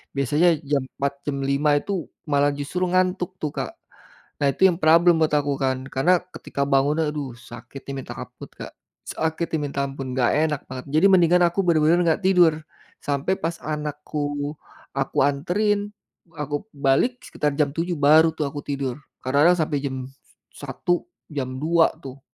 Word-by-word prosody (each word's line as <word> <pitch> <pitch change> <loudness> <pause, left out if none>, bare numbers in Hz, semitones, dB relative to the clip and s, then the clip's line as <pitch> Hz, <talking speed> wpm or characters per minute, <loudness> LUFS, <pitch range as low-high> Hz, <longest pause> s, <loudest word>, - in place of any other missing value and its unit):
biasanya 150 +6 +3
jam 140 -1 0
4:00, 140 +1 -4
jam 140 -1 -2
5:00 140 +2 +2
itu 175 +3 -2 0.2
malah 145 -1 +2
justru 175 +6 -2
ngantuk 185 0 0
tuh 150 - -2
Kak. - - -4 0.7
Nah 140 - +3
itu 190 - +4
yang 180 - +3
problem 165 +1 +5
buat 155 - +3
aku 145 -1 +1
kan. 130 -1 -1
Karena, 170 +7 +2 0.2
ketika 140 0 -3
bangun, 140 +2 +2
aduh, 150 -3 -3
sakitnya 125 +3 -10
minta - - -8
ampun, - - -10
Kak. - - -10 0.3
Sakitnya 160 +1 -2
minta 140 -1 -3
ampun, 135 -1 -6
gak 120 - +3
enak 150 -2 +1
banget. 130 -1 -7
Jadi 155 +6 +4
mendingan 180 -1 +5
aku 175 +3 0
benar-benar 170 0 +3 0.2
gak - - -20
tidur. 180 -4 +5 0.5
Sampai 145 +7 -1
pas 165 +1 -2
anakku 150 -1 -4 0.4
aku 135 - -2
anterin, 205 +9 0 0.4
aku 145 +4 -4
balik 140 - +1
sekitar 150 -1 -2
jam 145 -1 +1
7:00 165 +4 -2
baru 155 +2 +5
tuh 155 - -2
aku 145 - -6
tidur. 140 -2 -3 0.2
Kadang-kadang 145 +7 +4
sampai 150 -1 -1
jam 135 -1 -2 0.5
1:00, 175 0 -2 0.2
jam 140 -4 -3
2:00 165 +1 +3
tuh. 135 0 -9
150 Hz, 160 wpm, -23 LUFS, 140-170 Hz, 0.7 s, problem